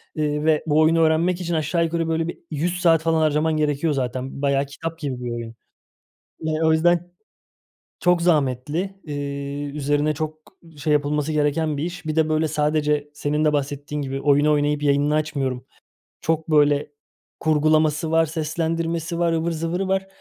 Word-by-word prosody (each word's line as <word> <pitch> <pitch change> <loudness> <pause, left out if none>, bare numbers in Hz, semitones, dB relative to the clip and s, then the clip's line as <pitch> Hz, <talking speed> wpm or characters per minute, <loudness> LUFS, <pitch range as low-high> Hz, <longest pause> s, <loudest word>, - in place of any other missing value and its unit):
eee, 150 -1 -1
ve 155 -1 +3
bu 150 0 +3
oyunu 160 +1 +4
öğrenmek 165 +3 +2
için 175 -1 -2
aşağı 160 +1 +1
yukarı 165 0 -1
böyle 165 0 0
bir 170 - -5
100 170 +4 -1
saat 165 -3 +4
falan 160 0 +1
harcaman 155 +1 +2
gerekiyor 150 +1 +1
zaten. 130 0 -3
Bayağı 140 -1 +2
kitap 165 +4 -7
gibi 130 -5 -4
bir 120 - -3
oyun. 115 -1 -6 0.8
Eee, 155 0 -2
o 160 - +4
yüzden 175 +2 +2 0.9
çok 180 -1 +3
zahmetli. 160 +4 0
Eee, 140 -1 -4
üzerine 145 +1 0
çok 155 +1 -4 0.4
şey 150 +1 0
yapılması 150 +1 +1
gereken 150 +1 +1
bir 145 - -2
iş. 175 -1 -6
Bir 155 0 -2
de 160 -1 +3
böyle 155 0 +1
sadece 150 -1 0
senin 150 +1 -1
de 150 - +3
bahsettiğin 145 +1 -2
gibi 135 0 -4
oyunu 145 +1 +3
oynayıp 145 0 +1
yayınını 145 +1 +2
açmıyorum. 140 -5 -1 0.6
Çok 160 0 -1
böyle 145 -1 +3 0.5
kurgulaması 155 0 +2
var, 165 0 +3
seslendirmesi 165 +2 -2
var, 170 -1 +2
ıvır 165 +1 0
zıvırı 165 +4 -2
var. 190 0 0
155 Hz, 165 wpm, -22 LUFS, 145-165 Hz, 0.9 s, oyunu